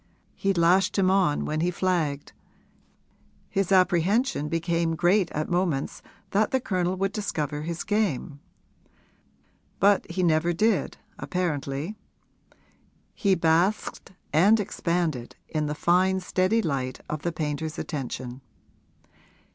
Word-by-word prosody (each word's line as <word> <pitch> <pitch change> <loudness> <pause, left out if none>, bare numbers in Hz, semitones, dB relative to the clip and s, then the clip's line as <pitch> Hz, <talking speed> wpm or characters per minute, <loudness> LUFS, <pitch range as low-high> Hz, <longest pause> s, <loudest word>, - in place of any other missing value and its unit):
He 195 - 0
lashed 185 +2 +3
him 190 -1 +3
on 185 -7 +2
when 155 +1 -2
he 175 - +2
flagged; 170 -6 -1 1.2
his 195 -1 0
apprehension 185 - +2
became 165 0 0
great 175 +2 +3
at 155 +1 -3
moments 175 -6 -1 0.3
that 210 +2 +2
the 265 - +1
Colonel 185 -5 -1
would 195 +1 -1
discover 155 -9 -3
his 170 +2 -4
game. 190 - -1 1.4
But 200 +1 +3
he 180 +2 -1
never 170 +1 +2
did, 215 +4 +1 0.2
apparently; 155 -1 -2 1.2
he 195 -3 +2
basked 170 +7 +1 0.2
and 200 +8 +5
expanded 170 - -2
in 155 -1 -2
the 150 - -3
fine 185 +4 +2
steady 185 +4 +1
light 130 -5 -2
of 150 -1 -4
the 170 - -1
painter's 155 0 -3
attention. 130 -3 -5
175 Hz, 115 wpm, -26 LUFS, 155-190 Hz, 1.4 s, and